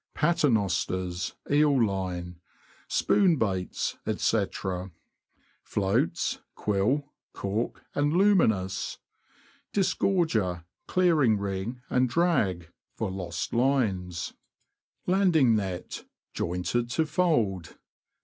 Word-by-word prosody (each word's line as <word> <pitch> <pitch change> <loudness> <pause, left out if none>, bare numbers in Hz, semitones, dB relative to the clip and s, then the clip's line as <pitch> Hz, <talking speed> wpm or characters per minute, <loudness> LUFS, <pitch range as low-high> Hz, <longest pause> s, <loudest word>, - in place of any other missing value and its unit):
Paternosters, 95 - 0 0.2
eel 145 -2 +4
line. 90 -3 -4 0.5
Spoon 190 -5 +3
baits, 95 -8 -2 0.2
&c. - - +2 1.2
Floats 95 -3 0
— - - -55
quill, 125 +9 0 0.2
cork, 105 +4 -3
and 145 0 +1
luminous. 165 - +2 0.7
Disgorger, 160 - +1 0.2
clearing 155 - +3
ring, 100 +5 -4
and 125 0 +2
drag 105 - +1 0.2
(for 110 -4 -2
lost 90 -3 -4
lines). 110 -9 0 0.7
Landing 175 - +4
net, 95 -4 -4 0.3
jointed 90 +8 -1
to 160 +7 +1
fold. 130 - 0
110 Hz, 80 wpm, -27 LUFS, 95-150 Hz, 1.2 s, eel